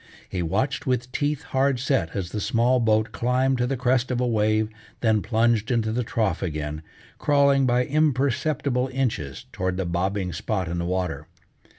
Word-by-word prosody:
He 90 - -3
watched 130 - -1
with 125 -1 0
teeth 145 +2 -1
hard 135 -1 +1
set 85 -10 0
as 95 -3 -3
the 105 - -3
small 120 +4 +2
boat 110 -1 +2
climbed 130 +2 +1
to 125 - +1
the 135 +1 -1
crest 125 +1 +1
of 125 -1 -1
a 125 - +1
wave, 110 -2 +2 0.3
then 110 -3 +3
plunged 115 -1 +1
into 115 -3 +1
the 125 +2 0
trough 110 -6 -1
again, 75 -3 -3 0.4
crawling 140 -2 +3
by 125 0 +2
imperceptible 140 -2 +1
inches 115 - -2
toward 95 0 -2
the 95 - -1
bobbing 90 +2 -1
spot 95 +2 -2
in 85 +1 -3
the 85 - -2
water. 90 -2 -2
115 Hz, 175 wpm, -24 LUFS, 95-130 Hz, 0.4 s, then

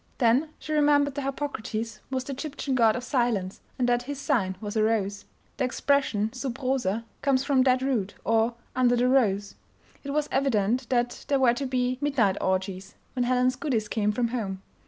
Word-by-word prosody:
Then 255 +5 +3
she 310 - -5
remembered 290 -1 +3
that 285 - -3
Harpocrates 230 -5 -4
was 260 -1 -2
the 275 - -5
Egyptian 280 0 -4
god 225 -3 +4
of 250 - -4
silence, 235 -8 -1 0.2
and 250 - +1
that 240 0 +2
his 275 +2 -6
sign 225 -10 0
was 210 -1 -6
a 220 - +2
rose. 205 -2 0 0.3
The 275 - 0
expression 250 -5 +1
"sub 260 -1 -4
rosa" 245 -5 -1 0.2
comes 270 -2 +2
from 275 -2 +3
that 255 0 +3
root, 230 -8 -1
or 225 +1 +2 0.2
"under 245 -1 +3
the 245 +1 +2
rose." 205 -6 +2 0.5
It 280 - -6
was 295 +1 0
evident 245 -2 +1
that 245 -1 0
there 280 - +2
were 250 -3 +5
to 275 +2 -3
be 255 0 0
"midnight 240 -10 +2
orgies" 190 +1 -2 0.2
when 250 -2 0
Helen's 255 +1 +2
goodies 250 -7 -1
came 210 -1 0
from 235 +2 0
home. 195 -6 -4
250 Hz, 185 wpm, -26 LUFS, 215-270 Hz, 0.5 s, were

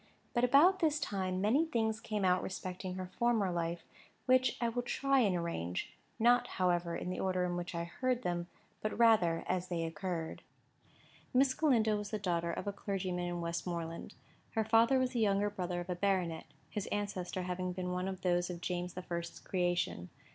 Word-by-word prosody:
But 240 - +1
about 300 +10 +6
this 310 -4 +2
time 185 -5 -2
many 235 +10 +4
things 220 -5 0
came 210 -3 -2
out 180 0 +4
respecting 185 0 -5
her 185 -1 -6
former 230 -6 +3
life, 170 -1 -2 0.4
which 255 -1 +4
I 235 - +1
will 240 +1 -1
try 275 +2 +2
and 200 -7 +3
arrange: 165 - -3 0.2
not 240 +2 +4
however, 175 -2 +1
in 180 - -3
the - - -4
order 185 -1 +1
in 175 0 -1
which 175 0 -4
I 170 - -1
heard 250 +8 -1
them, 175 -1 -1 0.3
but 215 - -2
rather 215 -8 +4
as 185 0 -1
they 170 -2 -2
occurred. 165 0 -4 0.9
Miss 260 0 +5
Galindo 225 -9 +3
was 205 0 -5
the 215 - -2
daughter 170 -4 -1
of - - -4
a 200 - -2
clergyman 185 -3 -2
in 175 0 -3
Westmoreland. 170 0 -4 0.4
Her 220 -1 +1
father 230 +4 +5
was 255 -1 +1
the 245 - -1
younger 205 -1 +2
brother 180 -3 -3
of 175 - -9
a - - -1
baronet, 180 -4 0 0.3
his 210 -3 -3
ancestor 190 -3 -2
having 180 0 -2
been 180 0 -3
one 180 +1 -1
of 190 -1 -5
those 175 -1 +1
of 175 -1 -5
James 180 0 -3
the 185 - -5
First's 170 -1 -5
creation. 175 - -1
185 Hz, 190 wpm, -34 LUFS, 175-220 Hz, 0.9 s, about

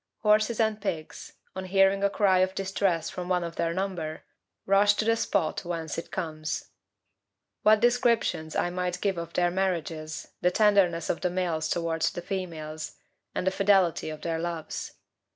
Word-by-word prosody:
Horses 215 +1 +3
and 220 -2 +1
pigs, 165 -6 -5 0.2
on 190 0 -4
hearing 195 +1 +3
a 200 - +4
cry 195 -2 +3
of 185 +1 +1
distress 195 -3 0
from 180 0 -5
one 180 -1 +2
of 170 0 -5
their 165 0 0
number, 175 -4 -3 0.4
rush 200 +1 +5
to 215 - -1
the 230 0 +4
spot 195 -7 0
whence 165 -3 -4
it 165 - -6
comes. 155 -4 -4 0.9
What 215 0 +5
descriptions 235 -9 +2
I 175 - +1
might 180 0 -2
give 195 -3 0
of 170 - -7
their 175 -1 +2
marriages, 165 -4 -2
the 180 - +4
tenderness 185 -4 +3
of 165 - -5
the 180 - +1
males 175 -3 -1
towards 165 -1 0
the 175 - -5
females, 160 -5 -5 0.4
and - - -1
the 190 - +3
fidelity 190 -5 +3
of 155 -1 -7
their 165 -1 -2
loves! 170 -1 -4
180 Hz, 170 wpm, -27 LUFS, 165-195 Hz, 0.9 s, rush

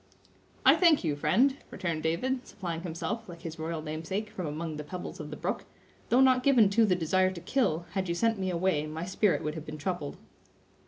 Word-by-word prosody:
"I - - +8
thank 335 - +5
you, 155 -4 0
friend," 255 - +3
returned 170 -4 -3
David, 250 +12 -1
supplying 170 -4 -5
himself, 185 +6 -4
like 170 0 -10
his 165 -1 -6
royal 160 0 -3
namesake, 165 +7 -4
from 185 -6 -4
among 155 +1 -4
the 150 - -5
pebbles 180 +4 -7
of 150 -1 -6
the 150 - -7
brook; - - -3 0.4
"though 250 - +5
not 260 -1 +5
given 250 -7 +5
to 225 +3 +5
the 185 -4 +3
desire 185 +2 +2
to 185 -2 -7
kill, 175 - 0
had 190 -2 -2
you 170 - 0
sent 225 +3 +1
me 190 -1 -1
away 170 -4 +1
my 160 +2 -5
spirit 190 +1 +1
would 150 - -2
have 160 -1 -8
been 155 0 -6
troubled." 150 -1 -3
180 Hz, 210 wpm, -29 LUFS, 160-210 Hz, 0.4 s, I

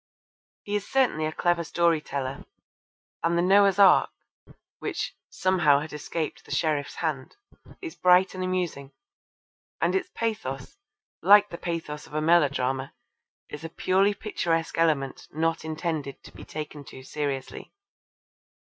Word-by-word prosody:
He 205 - -3
is 205 -1 -2
certainly 245 -13 +2
a - - -3
clever 175 +1 +1
story 170 0 +2
teller, 135 -2 -5 0.8
and 170 +1 +1
The 170 - +2
Noah's 195 +1 +5
Ark 195 -3 +6 0.7
(which - - -4
'somehow 175 -6 +3
had 155 +1 -7
escaped 155 +2 -4
the - - -19
sheriff's 150 -3 -1
hand') 150 -6 -3 0.5
is 335 - -5
bright 180 +1 +4
and 185 -1 -4
amusing, 175 -7 -3 0.9
and - - +1
its 380 -1 -1
pathos, 215 - -4 0.4
like 205 0 +7
the 170 - -7
pathos 165 -3 -5
of 150 - -11
a - - +1
melodrama, 140 -5 +2 0.5
is 150 +1 -9
a 165 - -5
purely 195 +4 +2
picturesque 165 -7 -2
element 150 -5 0
not 165 +1 -1
intended 155 -3 -4
to - - -13
be - - -12
taken 150 -1 -7
too 130 -1 -12
seriously. 140 -2 -4
165 Hz, 140 wpm, -26 LUFS, 150-185 Hz, 0.9 s, like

